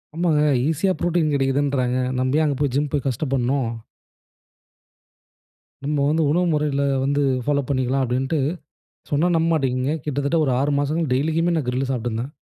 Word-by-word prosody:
ஆமாங்க. 165 Hz, -3 st, +2 dB, 0.3 s
ஈசியா 185 Hz, +5 st, +1 dB
புரோட்டீன் 170 Hz, -3 st, +1 dB
கெடைக்குதுன்றாங்க. 135 Hz, -2 st, +1 dB, 0.2 s
நம்ப 130 Hz, +3 st, +1 dB
ஏன் 155 Hz, -, +2 dB
அங்க 145 Hz, -2 st, 0 dB
போய் 140 Hz, -3 st, 0 dB
ஜிம் 145 Hz, 0 st, 0 dB
போய் 140 Hz, -3 st, -1 dB
கஷ்டப்படணும்? 130 Hz, -1 st, 0 dB, 2.1 s
"நம்ப 145 Hz, 0 st, -1 dB
வந்து 160 Hz, +2 st, +2 dB
உணவு 175 Hz, +3 st, +2 dB
முறையுல 145 Hz, -2 st, 0 dB, 0.2 s
வந்து 140 Hz, +1 st, +1 dB, 0.2 s
ஃபாலோ 145 Hz, +1 st, +1 dB
பண்ணிக்கலாம்" 130 Hz, 0 st, 0 dB
அப்படீன்ட்டு, 135 Hz, +5 st, -1 dB, 0.7 s
சொன்னா 150 Hz, +5 st, +2 dB
நம்ப 165 Hz, +1 st, +1 dB
மாட்டீங்கங்க, 135 Hz, 0 st, 0 dB
கிட்டத்தட்ட 145 Hz, +2 st, 0 dB
ஒரு 130 Hz, -, +1 dB
6 145 Hz, +1 st, +1 dB
மாசமா 155 Hz, +2 st, -1 dB
டெய்லிக்குமே 160 Hz, +5 st, +1 dB
நான் 135 Hz, -6 st, -2 dB
கிரில்லு 130 Hz, +2 st, -1 dB
சாப்ட்டுந்தேன். 120 Hz, +2 st, -3 dB
140 Hz, 145 wpm, -22 LUFS, 130-155 Hz, 2.1 s, ஆமாங்க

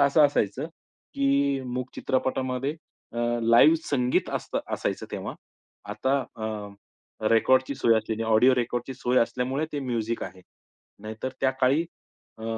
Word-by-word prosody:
असं 140 Hz, +2 st, +5 dB
असायचं, 110 Hz, -2 st, -1 dB, 0.5 s
की 140 Hz, 0 st, +2 dB
मूक 125 Hz, 0 st, -3 dB
चित्रपटामध्ये 130 Hz, +1 st, -1 dB, 0.4 s
अ, 120 Hz, -, -5 dB, 0.2 s
लाईव्ह 115 Hz, +7 st, +6 dB
संगीत 125 Hz, -3 st, +1 dB
असतं -, -, -2 dB, 0.2 s
असायचं -, -, -3 dB
तेव्हा -, -, -4 dB, 0.6 s
आता 135 Hz, +1 st, +1 dB, 0.2 s
अ, 110 Hz, -1 st, -4 dB, 0.8 s
रेकॉर्डची 130 Hz, +4 st, +3 dB
सोय 115 Hz, -3 st, +3 dB
असलेली 110 Hz, +1 st, -3 dB
ऑडिओ 115 Hz, +4 st, +5 dB
रेकॉर्डची 120 Hz, +1 st, -2 dB
सोय 125 Hz, 0 st, +1 dB
असल्यामुळे 125 Hz, +6 st, 0 dB
ते 145 Hz, -, -2 dB
म्युझिक 115 Hz, -3 st, -2 dB
आहे. 95 Hz, -, -10 dB, 0.6 s
नाहीतर 110 Hz, +4 st, -5 dB
त्या 130 Hz, -, +3 dB
काळी, 135 Hz, +5 st, +4 dB, 0.6 s
अ 110 Hz, -, -8 dB
130 Hz, 130 wpm, -26 LUFS, 115-135 Hz, 0.8 s, लाईव्ह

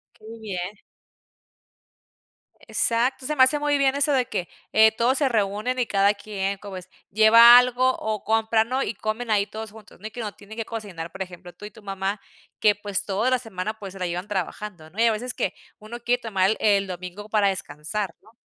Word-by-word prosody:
Qué 215 Hz, -, -19 dB
bien. 190 Hz, -3 st, -5 dB, 1.9 s
Exacto, 245 Hz, +3 st, 0 dB
se 300 Hz, -, -2 dB
me 260 Hz, -, +6 dB
hace 295 Hz, +3 st, +3 dB
muy 290 Hz, 0 st, +1 dB
bien 275 Hz, -1 st, +2 dB
eso 285 Hz, +1 st, +2 dB
de 255 Hz, -2 st, +2 dB
que, 180 Hz, -4 st, -3 dB, 0.2 s
eh, 220 Hz, 0 st, +6 dB
todos 245 Hz, +4 st, +2 dB
se 285 Hz, -, +2 dB
reúnen 215 Hz, +3 st, -1 dB
y 245 Hz, -, +2 dB
cada 200 Hz, 0 st, +3 dB
quien 200 Hz, -1 st, -4 dB
como 200 Hz, -2 st, -8 dB
es 185 Hz, -1 st, -11 dB, 0.2 s
lleva 230 Hz, +3 st, +8 dB
algo, 250 Hz, +1 st, +3 dB
o 215 Hz, -2 st, -3 dB
compra, 220 Hz, 0 st, +2 dB
¿no?, 255 Hz, +4 st, -1 dB
y -, -, -3 dB
comen 220 Hz, +3 st, -3 dB
ahí 200 Hz, -1 st, +3 dB
todos 220 Hz, 0 st, -7 dB
juntos, 215 Hz, -4 st, -16 dB
¿no? 215 Hz, -, -7 dB
Y -, -, -10 dB
que 240 Hz, -, -7 dB
no 210 Hz, -2 st, -5 dB
tiene 205 Hz, +2 st, -13 dB
que 225 Hz, -, -3 dB
cocinar, 195 Hz, -8 st, -7 dB
por 190 Hz, -, -9 dB
ejemplo, 180 Hz, -1 st, -8 dB
tú 190 Hz, -, -11 dB
y 210 Hz, -, -9 dB
tu 215 Hz, -, -17 dB
mamá 195 Hz, +1 st, -3 dB, 0.4 s
que, 210 Hz, -1 st, +4 dB
pues, 205 Hz, -1 st, -3 dB
toda 210 Hz, +5 st, 0 dB
la 255 Hz, -1 st, +2 dB
semana, 215 Hz, -3 st, -5 dB
pues, 195 Hz, -2 st, -8 dB
se 195 Hz, -, -11 dB
la 180 Hz, -, -1 dB
llevan 175 Hz, +3 st, -4 dB
trabajando, 190 Hz, -3 st, -5 dB
¿no? 200 Hz, +7 st, -11 dB
Y 230 Hz, -, +5 dB
a 230 Hz, -, +5 dB
veces 245 Hz, +3 st, -4 dB
que 190 Hz, -, -2 dB, 0.3 s
uno 225 Hz, +3 st, -9 dB
quiere 245 Hz, +1 st, 0 dB
tomar 195 Hz, -4 st, +1 dB
el 220 Hz, -, -2 dB
el 200 Hz, -2 st, +3 dB
domingo 185 Hz, +3 st, -7 dB
para 205 Hz, -2 st, +3 dB
descansar, 190 Hz, +2 st, -4 dB
¿no? 220 Hz, +2 st, -22 dB
215 Hz, 220 wpm, -24 LUFS, 195-235 Hz, 1.9 s, lleva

